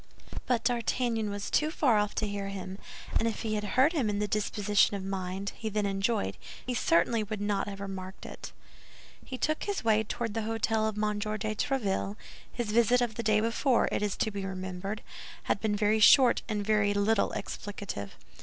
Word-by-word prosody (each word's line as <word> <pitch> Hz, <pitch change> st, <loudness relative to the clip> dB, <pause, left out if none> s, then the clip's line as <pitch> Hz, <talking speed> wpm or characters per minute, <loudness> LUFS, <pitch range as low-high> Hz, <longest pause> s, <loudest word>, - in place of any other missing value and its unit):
But 240 Hz, -2 st, +1 dB
D'Artagnan 235 Hz, -2 st, 0 dB
was 205 Hz, 0 st, -5 dB
too 305 Hz, -, +2 dB
far 260 Hz, -9 st, +3 dB
off 210 Hz, 0 st, -1 dB
to 215 Hz, -, 0 dB
hear 200 Hz, -1 st, -3 dB
him; 195 Hz, 0 st, -6 dB, 0.4 s
and 230 Hz, -, +1 dB
if 225 Hz, -, -3 dB
he 220 Hz, -1 st, -1 dB
had 210 Hz, -1 st, -1 dB
heard 270 Hz, +6 st, +5 dB
him 265 Hz, -10 st, +1 dB
in 205 Hz, -, -1 dB
the 210 Hz, 0 st, 0 dB
disposition 205 Hz, 0 st, +2 dB
of 190 Hz, -, -6 dB
mind 190 Hz, 0 st, -3 dB
he 220 Hz, -, -4 dB
then 210 Hz, 0 st, 0 dB
enjoyed, 195 Hz, -, 0 dB, 0.3 s
he 250 Hz, -, -2 dB
certainly 220 Hz, +1 st, +2 dB
would 210 Hz, 0 st, -4 dB
not 205 Hz, -1 st, 0 dB
have 200 Hz, -1 st, -6 dB
remarked 190 Hz, -1 st, -7 dB
it. -, -, -8 dB, 0.7 s
He 260 Hz, -, -6 dB
took 310 Hz, +4 st, -1 dB
his 405 Hz, -1 st, -2 dB
way 220 Hz, -1 st, +3 dB
toward 225 Hz, 0 st, -3 dB
the 225 Hz, -, -1 dB
hôtel 220 Hz, 0 st, 0 dB
of 215 Hz, -, -7 dB
M. 210 Hz, -1 st, 0 dB
de 215 Hz, 0 st, -2 dB
Tréville; 210 Hz, -5 st, -1 dB, 0.4 s
his 235 Hz, -3 st, -3 dB
visit 235 Hz, +2 st, +4 dB
of 240 Hz, -2 st, 0 dB
the 235 Hz, -, -3 dB
day 215 Hz, -2 st, +3 dB
before, 230 Hz, +3 st, +2 dB
it -, -, 0 dB
is 205 Hz, -2 st, -1 dB
to 225 Hz, -3 st, 0 dB
be 200 Hz, -1 st, -4 dB
remembered, 190 Hz, +2 st, -5 dB, 0.4 s
had 200 Hz, -, 0 dB
been 210 Hz, 0 st, +1 dB
very 210 Hz, +1 st, +2 dB
short 250 Hz, +3 st, +7 dB
and 210 Hz, -2 st, -1 dB
very 210 Hz, -1 st, +2 dB
little 205 Hz, +1 st, +2 dB
explicative. 200 Hz, -, -5 dB
210 Hz, 195 wpm, -29 LUFS, 200-230 Hz, 0.7 s, short